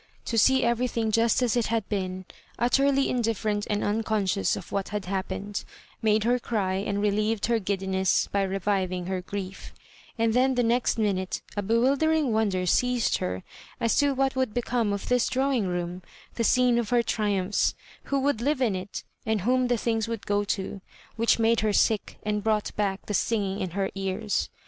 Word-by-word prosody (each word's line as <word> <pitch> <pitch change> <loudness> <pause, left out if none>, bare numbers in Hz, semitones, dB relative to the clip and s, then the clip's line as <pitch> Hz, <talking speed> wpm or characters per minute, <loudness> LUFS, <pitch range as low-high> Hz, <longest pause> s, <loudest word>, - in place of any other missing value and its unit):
To 235 - -2
see 265 +4 +4
everything 235 -1 0
juSt 230 +3 +3
as 245 -2 +1
it 240 -2 +1
had 225 -2 -1
been, 185 -2 -3 0.3
ut 240 +1 +1
terly 275 0 +3
indifferent 220 -3 -1
and 210 -1 0
unconsciousof 205 -2 0
what 195 -1 -2
had 210 -1 -3
bap^ 190 +1 -2
pened, 200 +1 -5 0.4
made 215 -1 +3
her 245 +2 +2
cry, 195 -5 -1
and^reheved 210 +1 0
her 235 0 +2
giddiness 190 -1 0
by 200 - +1
reviving 190 -2 -1
her 185 0 -2
grief; 195 0 -7 0.4
and 225 -1 +2
then 260 +2 +3
the 245 - +2
next 235 +1 +1
minute 195 -4 -1
a 205 - 0
bewildering 270 +6 +2
wonder 200 -4 +1
seized 245 +5 +2
her 90 0 -3 0.4
as 230 - +1
to 285 -1 +3
what 270 0 +1
would 260 -4 -1
become 240 -3 0
of 200 -1 -3
this 250 -1 +2
drawing 260 -5 +1
room, 175 0 -3 0.3
the 230 - -1
scene 245 +1 +4
of 230 - -2
her 240 -1 +3
tri 215 -2 0
umphs; 190 +1 +1 0.3
who 275 - 0
would 275 -4 +1
live 285 +2 +1
in 240 -6 +2
it^ 185 +1 -5 0.2
and 220 -2 +1
whom 255 +5 +2
the 245 -1 +1
things 225 -1 -1
would 230 -2 -5
go 205 0 +1
to, 195 -1 -3 0.3
which 230 0 +3
made 230 0 +3
her 215 -1 +1
sick 215 0 +1
and 210 -1 -1
brought 215 -1 0
back 200 -1 -1
the 210 - -4
suiging 200 -1 0
in 185 - -2
her 195 +2 -2
ears. 195 +2 -2
215 Hz, 185 wpm, -26 LUFS, 195-240 Hz, 0.4 s, see